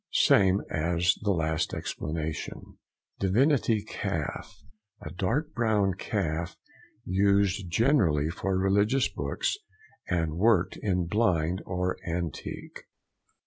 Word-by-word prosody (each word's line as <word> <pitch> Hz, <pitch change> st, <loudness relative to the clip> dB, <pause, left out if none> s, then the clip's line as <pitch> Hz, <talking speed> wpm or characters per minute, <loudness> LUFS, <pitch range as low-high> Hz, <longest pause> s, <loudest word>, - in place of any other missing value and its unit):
—Same 95 Hz, 0 st, +4 dB
as 85 Hz, +3 st, +2 dB
the 105 Hz, -, -1 dB
last 80 Hz, -3 st, 0 dB
explanation. 80 Hz, 0 st, -5 dB, 0.4 s
DIVINITY 115 Hz, +2 st, +2 dB
CALF.—A 105 Hz, -6 st, -6 dB
dark 115 Hz, -, -1 dB
brown 105 Hz, -5 st, +2 dB
calf 85 Hz, -4 st, -3 dB, 0.5 s
used 100 Hz, 0 st, +2 dB
generally 85 Hz, -, +2 dB
for 95 Hz, +1 st, -1 dB
religious 100 Hz, +7 st, +2 dB
books, 70 Hz, -8 st, -2 dB, 0.5 s
and 80 Hz, -2 st, -1 dB
worked 105 Hz, -3 st, +3 dB
in 90 Hz, -4 st, 0 dB
blind 90 Hz, -3 st, +1 dB
or 90 Hz, 0 st, -1 dB
antique. 85 Hz, -3 st, -5 dB
95 Hz, 95 wpm, -28 LUFS, 85-105 Hz, 0.5 s, Same